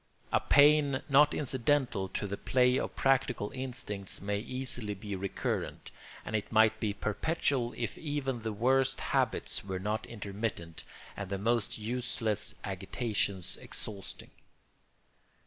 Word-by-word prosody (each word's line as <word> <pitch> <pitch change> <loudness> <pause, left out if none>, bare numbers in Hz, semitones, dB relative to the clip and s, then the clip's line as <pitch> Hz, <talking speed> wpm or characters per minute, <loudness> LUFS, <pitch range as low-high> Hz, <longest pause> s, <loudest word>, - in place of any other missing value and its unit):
A - - +5
pain 145 -1 +5
not 145 +2 +6
incidental 130 -6 +1
to 100 - -3
the 100 0 -3
play 125 +3 +3
of - - -4
practical 130 -5 +2
instincts 125 -7 -4
may 100 +1 -1
easily 125 -3 -3
be 100 +1 -5
recurrent, 95 0 -3 0.3
and 110 - -3
it 105 - -2
might 110 0 +5
be 105 -1 0
perpetual 120 +4 -1
if 120 -3 -3
even 145 -5 -2
the 110 0 -3
worst 130 +5 +2
habits - - 0
were 95 -1 -3
not 105 +4 -2
intermittent 100 -6 -4 0.3
and 100 -2 -5
the 100 - -1
most 115 +2 0
useless 110 -2 0
agitations 100 -1 -1
exhausting. 100 -3 -7
110 Hz, 130 wpm, -31 LUFS, 100-130 Hz, 0.3 s, not